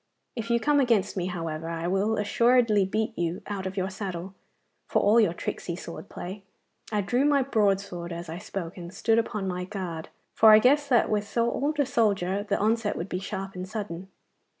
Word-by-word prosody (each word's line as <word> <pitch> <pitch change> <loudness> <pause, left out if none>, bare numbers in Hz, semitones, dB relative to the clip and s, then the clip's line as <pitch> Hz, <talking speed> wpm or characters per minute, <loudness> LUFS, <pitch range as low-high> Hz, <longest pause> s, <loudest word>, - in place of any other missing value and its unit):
If 230 -1 -4
you 235 0 +3
come 290 +4 +3
against 230 -7 +2
me, 180 -2 -1
however, 165 -2 -4
I 165 0 -3
will 195 +5 +1
assuredly 230 -1 +3
beat 220 +4 -2
you 170 +1 -2
out 195 -2 -4
of 190 +1 -7
your 190 0 -1
saddle, 190 -1 -5 0.5
for - - +2
all 210 +3 +5
your 210 -7 +4
tricky 170 0 -4
sword 170 +2 -9
play.' 190 +3 -7 0.5
I 210 -1 +1
drew 245 +7 +1
my 285 -2 +4
broadsword 195 -7 0
as 170 +1 -6
I 165 +2 -6
spoke, 190 -4 -6
and 175 -1 -8
stood 225 +4 +2
upon 210 -4 -2
my 180 -1 -2
guard, 180 -4 -5 0.2
for 220 - +6
I 215 - +10
guessed 285 +6 +3
that 240 -4 +3
with 210 -1 0
so 235 +2 +1
old 295 +2 -1
a 285 - +4
soldier 200 -6 +1
the 205 -1 0
onset 220 0 +1
would 170 +4 -5
be 180 - -2
sharp 195 0 -5
and 185 0 -6
sudden. 195 -4 -5
200 Hz, 200 wpm, -27 LUFS, 180-225 Hz, 0.5 s, I